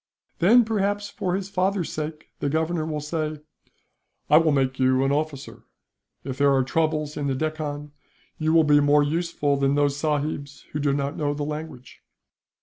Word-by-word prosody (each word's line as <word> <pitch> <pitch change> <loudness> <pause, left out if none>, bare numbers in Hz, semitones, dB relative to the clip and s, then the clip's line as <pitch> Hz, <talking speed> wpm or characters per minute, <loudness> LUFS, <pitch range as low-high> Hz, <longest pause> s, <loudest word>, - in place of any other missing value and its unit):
"'Then, 230 +7 +6
perhaps 205 -1 -1
for 180 -1 -2
his 195 0 -3
father's 190 -2 -1
sake, 155 0 -6
the 140 - -1
Governor 160 +1 -1
will 155 -1 -3
say: 155 0 -3 0.9
"'"I 150 - +8
will 160 -1 +4
make 135 -2 0
you 130 0 +3
an 135 - +1
officer. 145 -1 -3 0.6
If 135 0 -6
there 140 0 +4
are 130 - +3
troubles 155 +1 -1
in 145 -1 -2
the 135 - 0
Deccan, 150 0 -4 0.5
you 155 0 +1
will 165 0 +5
be 150 -1 +5
more 145 0 +4
useful 150 -2 0
than 140 0 +1
those 145 -1 +2
sahibs 145 -1 -2
who 150 - -3
do 145 -1 +1
not 140 +1 -2
know 145 -1 -1
the 145 - -3
language."' 150 -5 -7
150 Hz, 175 wpm, -24 LUFS, 140-160 Hz, 0.9 s, I